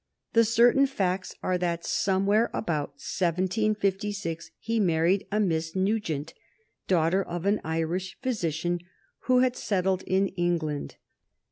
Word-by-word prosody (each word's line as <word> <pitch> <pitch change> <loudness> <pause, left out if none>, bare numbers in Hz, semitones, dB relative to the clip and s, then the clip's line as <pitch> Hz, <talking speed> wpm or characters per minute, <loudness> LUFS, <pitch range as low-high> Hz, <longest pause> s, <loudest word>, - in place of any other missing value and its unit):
The 230 - +6
certain 240 +5 +5
facts 190 -7 -2
are 185 -1 0
that 170 -1 -1
somewhere 200 +3 +2
about 150 -7 -2
1756 190 +1 -1
he 230 0 -1
married 175 0 +2
a 210 - +1
Miss 165 -4 0
Nugent, 185 -6 -1 0.5
daughter 175 +1 +3
of 175 0 -5
an 205 +1 +2
Irish 165 +4 -2
physician 175 - -1 0.5
who 255 -1 +4
had 255 -1 +2
settled 190 -2 0
in 190 +1 +2
England. 165 -4 -2
185 Hz, 120 wpm, -27 LUFS, 170-210 Hz, 0.5 s, The